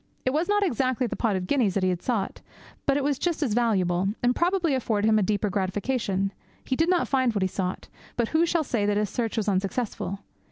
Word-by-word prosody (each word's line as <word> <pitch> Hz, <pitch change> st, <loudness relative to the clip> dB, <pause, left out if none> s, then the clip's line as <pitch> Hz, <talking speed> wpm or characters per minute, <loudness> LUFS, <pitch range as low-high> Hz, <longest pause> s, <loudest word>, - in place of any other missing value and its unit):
It 255 Hz, -, +2 dB
was 315 Hz, +7 st, 0 dB
not 415 Hz, 0 st, +3 dB
exactly 255 Hz, -, +1 dB
the -, -, -3 dB
pot 225 Hz, -4 st, 0 dB
of 185 Hz, -1 st, -2 dB
guineas 220 Hz, -4 st, +1 dB
that 195 Hz, -, +1 dB
he 185 Hz, -1 st, +2 dB
sought; 210 Hz, -2 st, -2 dB, 0.5 s
but 275 Hz, 0 st, +3 dB
it 285 Hz, -, 0 dB
was 280 Hz, -1 st, 0 dB
just 340 Hz, -3 st, 0 dB
as 240 Hz, -7 st, 0 dB
valuable, 190 Hz, -6 st, +2 dB, 0.2 s
and 245 Hz, +1 st, +3 dB
probably 345 Hz, -3 st, +1 dB
afforded 220 Hz, -5 st, +1 dB
him 215 Hz, -1 st, +4 dB
a -, -, +1 dB
deeper 205 Hz, +1 st, 0 dB
gratification. 195 Hz, 0 st, -1 dB, 0.3 s
He 260 Hz, -, 0 dB
did 325 Hz, +5 st, +2 dB
not 360 Hz, -1 st, +2 dB
find 260 Hz, -4 st, +1 dB
what 200 Hz, -, +1 dB
he -, -, +3 dB
sought, 185 Hz, 0 st, -3 dB, 0.3 s
but 235 Hz, -2 st, +1 dB
who 325 Hz, +2 st, +3 dB
shall 335 Hz, -1 st, +1 dB
say 225 Hz, -7 st, 0 dB
that 205 Hz, 0 st, +2 dB
his 210 Hz, -1 st, 0 dB
search 230 Hz, -2 st, -2 dB
was 215 Hz, -, 0 dB
unsuccessful? 200 Hz, +1 st, -1 dB
230 Hz, 230 wpm, -26 LUFS, 195-275 Hz, 0.5 s, him